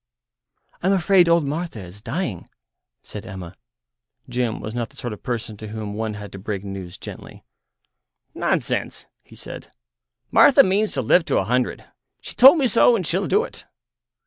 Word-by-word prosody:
"I'm 190 Hz, +3 st, +2 dB
afraid 185 Hz, -1 st, +4 dB
old 170 Hz, -2 st, +3 dB
Martha 150 Hz, -, -4 dB
is 90 Hz, +4 st, -12 dB
dying," 120 Hz, -, -4 dB, 0.5 s
said 105 Hz, -, -8 dB
Emma. 95 Hz, -5 st, -9 dB, 0.7 s
Jim 120 Hz, -2 st, -2 dB
was 110 Hz, -, -6 dB
not 120 Hz, -2 st, -3 dB
the -, -, -22 dB
sort 120 Hz, -3 st, -5 dB
of 105 Hz, -, -11 dB
person 115 Hz, -3 st, -4 dB
to 110 Hz, -, -8 dB
whom 105 Hz, -1 st, -6 dB
one 110 Hz, 0 st, -3 dB
had 105 Hz, 0 st, -9 dB
to 95 Hz, -, -9 dB
break 100 Hz, 0 st, -4 dB
news 95 Hz, -3 st, -7 dB
gently. -, -, -10 dB, 0.9 s
"Nonsense," -, -, -2 dB, 0.2 s
he -, -, -17 dB
said; -, -, -10 dB, 0.6 s
"Martha -, -, +7 dB
means 200 Hz, +3 st, +1 dB
to 130 Hz, -, -1 dB
live 175 Hz, +10 st, +4 dB
to -, -, 0 dB
a -, -, +2 dB
hundred. 125 Hz, +4 st, -1 dB, 0.3 s
She -, -, -9 dB
told 270 Hz, +7 st, +8 dB
me 280 Hz, -, +2 dB
so, 240 Hz, 0 st, +5 dB
and 190 Hz, -6 st, -2 dB
she'll 185 Hz, +5 st, 0 dB
do 425 Hz, -, +2 dB
it." -, -, -10 dB
120 Hz, 170 wpm, -22 LUFS, -, 0.9 s, told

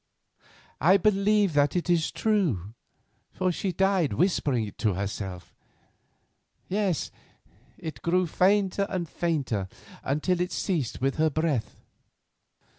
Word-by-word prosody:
I 185 Hz, +5 st, +6 dB
believe 205 Hz, -1 st, +2 dB
that 145 Hz, +2 st, +2 dB
is 170 Hz, -3 st, +2 dB
true, 155 Hz, -, 0 dB, 0.6 s
for 185 Hz, -1 st, 0 dB
she 185 Hz, +2 st, -2 dB
died 190 Hz, -4 st, +1 dB
whispering 145 Hz, -, +1 dB
it 100 Hz, -, -10 dB
herself; 100 Hz, -3 st, -3 dB, 1.1 s
yes, 195 Hz, -5 st, -1 dB, 0.7 s
it 150 Hz, -7 st, -7 dB
grew 180 Hz, +2 st, +2 dB
fainter 195 Hz, +3 st, +2 dB
and 180 Hz, -3 st, -2 dB
fainter 140 Hz, -, -1 dB, 0.4 s
until 170 Hz, +6 st, 0 dB
it 180 Hz, 0 st, -1 dB
ceased 155 Hz, -, -2 dB
with 135 Hz, +1 st, 0 dB
her 160 Hz, 0 st, +3 dB
breath. 150 Hz, -7 st, -2 dB
170 Hz, 110 wpm, -27 LUFS, 135-190 Hz, 1.1 s, I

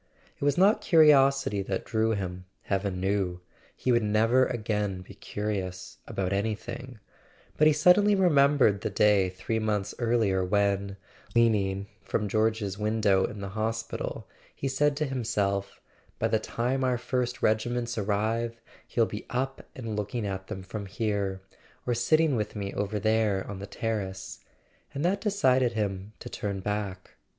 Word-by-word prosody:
It -, -, -8 dB
was 145 Hz, -1 st, +2 dB
not 205 Hz, +4 st, +5 dB
curiosity 140 Hz, -, +5 dB
that 95 Hz, -1 st, -3 dB
drew 110 Hz, -1 st, +1 dB
him, 90 Hz, -3 st, -4 dB, 0.2 s
heaven 95 Hz, -1 st, -1 dB
knew—he 95 Hz, +4 st, -3 dB
would 120 Hz, -1 st, +4 dB
never 115 Hz, +5 st, +3 dB
again 105 Hz, -5 st, -2 dB
be 90 Hz, -, -12 dB
curious 95 Hz, -3 st, -4 dB
about 95 Hz, 0 st, -2 dB
anything—but 110 Hz, +7 st, -3 dB
he -, -, +7 dB
suddenly 180 Hz, +7 st, +5 dB
remembered 140 Hz, -, +4 dB
the -, -, -1 dB
day 105 Hz, -3 st, +3 dB
three 95 Hz, +5 st, -3 dB
months 105 Hz, -2 st, -1 dB
earlier 115 Hz, -6 st, +2 dB
when, 100 Hz, 0 st, 0 dB, 0.4 s
leaning 100 Hz, -4 st, +2 dB, 0.2 s
from 105 Hz, -, -2 dB
George's 110 Hz, -2 st, 0 dB
window 105 Hz, -3 st, +2 dB
in 105 Hz, -, -6 dB
the 100 Hz, -, -4 dB
hospital, 110 Hz, +2 st, -3 dB, 0.3 s
he -, -, -6 dB
had 135 Hz, -, 0 dB
said 145 Hz, +1 st, +2 dB
to 155 Hz, -, 0 dB
himself 105 Hz, -7 st, -1 dB, 0.4 s
"By -, -, 0 dB
the -, -, +2 dB
time 130 Hz, +3 st, -1 dB
our 125 Hz, -1 st, +2 dB
first 125 Hz, 0 st, -2 dB
regiments 120 Hz, +2 st, +1 dB
arrive 110 Hz, +3 st, -1 dB, 0.3 s
he'll 115 Hz, -, +2 dB
be 105 Hz, 0 st, -7 dB
up 135 Hz, +2 st, -3 dB
and 115 Hz, -4 st, -5 dB
looking 105 Hz, +2 st, -3 dB
at 95 Hz, -1 st, -4 dB
them 95 Hz, -3 st, -6 dB
from 100 Hz, +2 st, -6 dB
here, 100 Hz, -2 st, -2 dB, 0.4 s
or 125 Hz, -, +1 dB
sitting 155 Hz, +5 st, +3 dB
with 105 Hz, -2 st, -2 dB
me 100 Hz, -1 st, -4 dB
over 105 Hz, +1 st, -2 dB
there 110 Hz, -2 st, +1 dB
on 100 Hz, -2 st, -6 dB
the 100 Hz, -, -7 dB
terrace"; 95 Hz, -3 st, -4 dB, 0.6 s
and 140 Hz, +4 st, -1 dB
that 195 Hz, +3 st, +1 dB
decided 130 Hz, -, +2 dB
him 100 Hz, -1 st, -3 dB
to -, -, -10 dB
turn 100 Hz, -2 st, -4 dB
back. 100 Hz, -2 st, -4 dB
110 Hz, 150 wpm, -28 LUFS, 100-125 Hz, 0.6 s, he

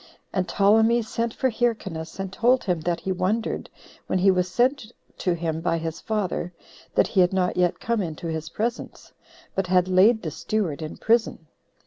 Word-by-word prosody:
And 185 Hz, -2 st, 0 dB
Ptolemy 225 Hz, +4 st, +4 dB
sent 230 Hz, +1 st, -2 dB
for 260 Hz, +2 st, 0 dB
Hyrcanus, 195 Hz, -9 st, -2 dB
and 190 Hz, -1 st, -4 dB
told 250 Hz, +4 st, +3 dB
him 175 Hz, -4 st, -1 dB
that 170 Hz, +1 st, -1 dB
he 190 Hz, -, -2 dB
wondered, 195 Hz, +5 st, -1 dB, 0.4 s
when -, -, 0 dB
he 190 Hz, +1 st, +5 dB
was 180 Hz, -1 st, 0 dB
sent 245 Hz, +2 st, +1 dB, 0.3 s
to 180 Hz, -, +1 dB
him 165 Hz, -1 st, -3 dB
by 165 Hz, -1 st, 0 dB
his 165 Hz, 0 st, -5 dB
father, 195 Hz, -5 st, -2 dB, 0.4 s
that -, -, +5 dB
he 190 Hz, -, +3 dB
had 180 Hz, -, +4 dB
not 180 Hz, -1 st, +1 dB
yet 180 Hz, -1 st, +1 dB
come 230 Hz, -2 st, 0 dB
into 165 Hz, -2 st, -5 dB
his 160 Hz, -1 st, -3 dB
presence, 235 Hz, +6 st, -4 dB, 0.4 s
but 195 Hz, -1 st, -1 dB
had 180 Hz, 0 st, +3 dB
laid 200 Hz, +5 st, +4 dB
the 160 Hz, -, -3 dB
steward 175 Hz, -4 st, -2 dB
in 155 Hz, -, -6 dB
prison. 225 Hz, -7 st, +1 dB
185 Hz, 180 wpm, -24 LUFS, 170-220 Hz, 0.4 s, he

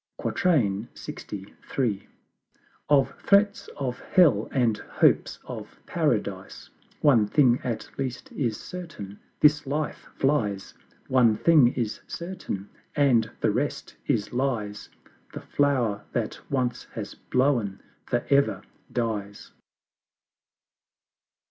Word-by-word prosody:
LXIII. 105 Hz, -, -1 dB, 1.4 s
Of 135 Hz, -2 st, +4 dB
threats 200 Hz, 0 st, +3 dB
of 130 Hz, -3 st, -3 dB
Hell 145 Hz, -, +4 dB
and 120 Hz, -5 st, +2 dB
Hopes -, -, +2 dB
of -, -, -8 dB
Paradise! -, -, -2 dB, 0.3 s
One 120 Hz, -8 st, +5 dB
thing 125 Hz, 0 st, +4 dB
at 115 Hz, -4 st, -3 dB
least 130 Hz, -2 st, -4 dB
is 115 Hz, -6 st, -2 dB
certain 155 Hz, -, -8 dB, 0.2 s
This 150 Hz, -1 st, +5 dB
Life 150 Hz, +2 st, -3 dB
flies; 110 Hz, -9 st, 0 dB, 0.3 s
One 120 Hz, -4 st, +4 dB
thing 155 Hz, -7 st, +6 dB
is 115 Hz, -4 st, -2 dB
certain 170 Hz, -, -5 dB, 0.3 s
and 125 Hz, -7 st, +4 dB
the -, -, +3 dB
rest -, -, -2 dB
is 105 Hz, -, 0 dB
Lies; 115 Hz, -6 st, -2 dB, 0.4 s
The -, -, -6 dB
Flower 125 Hz, -8 st, +1 dB
that 115 Hz, -3 st, -2 dB
once 125 Hz, -3 st, -1 dB
has -, -, -5 dB
blown 125 Hz, -7 st, 0 dB, 0.3 s
for 120 Hz, -, 0 dB
ever 140 Hz, 0 st, +3 dB, 0.3 s
dies. 105 Hz, -4 st, -3 dB
125 Hz, 100 wpm, -26 LUFS, 105-145 Hz, 1.4 s, thing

